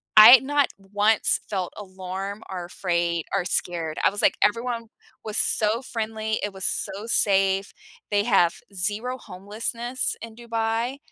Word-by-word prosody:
I 215 +4 +11
not 285 0 +2
once 205 +3 +1
felt 190 -4 -3
alarm 190 +1 -6
or 180 -2 -5
afraid 170 -2 -1
or 180 - 0
scared, 165 -3 -2
I - - +5
was 205 - -3
like, - - +4
everyone 230 +2 0 0.4
was 215 0 -3
so 220 +3 +1
friendly, 220 -3 -3
it 205 -1 -3
was 190 -1 -5
so 205 +4 -3
safe. 195 -2 +2 0.4
They 205 0 +3
have 185 -7 +3 0.2
zero 215 +7 -2
homelessness 230 +6 -3
in 225 -1 -9
Dubai, 230 +2 -2
210 Hz, 140 wpm, -24 LUFS, 190-230 Hz, 0.4 s, I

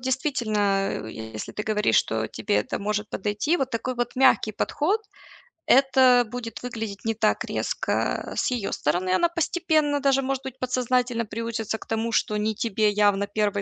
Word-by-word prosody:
действительно, 260 -4 -1 0.3
а, - - -4
если 110 -1 -7
ты 210 - -4
говоришь, 210 - +2
что 110 0 +1
тебе 105 -2 -1
это 105 - -1
может 210 +1 -2
подойти, 210 - 0
вот 265 -3 -2
такой 250 +2 -2
вот 240 0 -2
мягкий 260 -4 +4
подход, 360 - 0 0.7
это 260 -2 +5
будет 245 -2 -6
выглядеть 225 -4 -5
не 225 - +1
так 220 -1 +1
резко - - -2
с - - 0
её 235 -5 -2
стороны. 180 +5 0
Она 335 - +3
постепенно, 315 -3 +1
даже, 275 -1 +3
может 270 0 -2
быть, 265 -1 -7
подсознательно 250 -1 0
приучится 225 0 -3
к - - -13
тому, 225 +1 -2
что 210 -1 +1
не 215 0 -1
тебе 215 -1 +1
явно 205 -1 +2
1 205 -1 0
230 Hz, 170 wpm, -25 LUFS, 210-260 Hz, 0.7 s, это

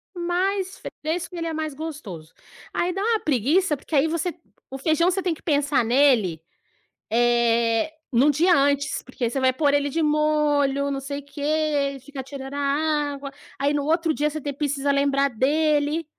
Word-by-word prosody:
mas 370 +2 -1 0.2
fresco 335 +3 -3
ele 330 -1 -3
é 325 - -3
mais 310 -2 -3
gostoso. 255 - -8 0.4
Aí 360 +1 0
dá 390 - -3
uma 445 +1 +2
preguiça, 300 - +1
porque 300 - -6
aí 280 +3 +4
você 335 +2 -2 0.4
o 270 - -6
feijão 315 +5 +2
você 385 +1 -1
tem 360 -2 0
que 315 - -12
pensar 290 -4 +1
nele, 230 - +3 0.7
eh, 235 +2 +2 0.2
num 260 +4 +4
dia 335 +5 +3
antes, 280 0 +1
porque 250 -2 -3
você 270 - -2
vai 260 -1 +3
pôr 285 +1 +2
ele 285 0 +2
de 325 +4 -1
molho, 295 -2 +2
não 275 - -2
sei 280 +1 -5
o 280 - -14
quê, 285 0 -10
ele 290 -2 0
fica 275 +1 -7
tirando 270 0 -8
a 285 - -3 0.5
água, 275 0 -7 0.3
aí 285 +1 +1
no 290 - 0
outro 325 0 +1
dia 295 +1 0
você 310 0 -6
te 285 - -3
precisa 285 0 -1
lembrar 280 0 +2
dele, 295 +5 +1
285 Hz, 180 wpm, -24 LUFS, 275-315 Hz, 0.7 s, aí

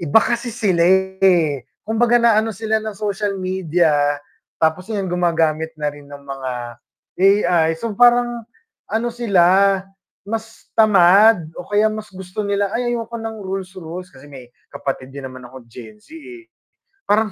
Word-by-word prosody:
iba 165 +8 +5
kasi 240 +2 -1
sila 210 -7 0
eh, 185 -5 +2 0.2
kumbaga 235 +2 +2
naano 225 -2 +3
sila 220 +1 -1
ng 215 -2 -6
social 205 -1 -2
media 180 -3 0 0.6
tapos 160 +4 0
yun 205 -3 -2
gumagamit 165 -3 0
na 150 -1 -2
rin 145 -1 -14
ng 140 0 -11
mga 135 -2 -5 0.7
AI 180 -5 +3
so, 230 +6 -4
parang 240 +1 +3 0.4
ano 225 +2 -1
sila 215 -7 +2 0.8
mas 225 +2 -7
tamad 200 -1 +5
o 175 - -10
kaya 205 +1 +3
mas 215 0 -7
gusto 185 +1 -7
nila," 200 -1 -1
Ay 240 +1 -1
ayoko 235 -1 -3
ng 225 0 -5
rules-rules." 185 -2 -6
Kasi 130 -5 -17
may 135 -4 -12 0.2
kapatid 135 -1 -5
din 140 - -7
naman 130 -1 -12
ako 120 -1 -13
Gen 125 - -12
Z 315 +9 -14
eh. 345 +2 -12 0.6
Parang 215 0 +2
195 Hz, 150 wpm, -19 LUFS, 165-220 Hz, 0.8 s, iba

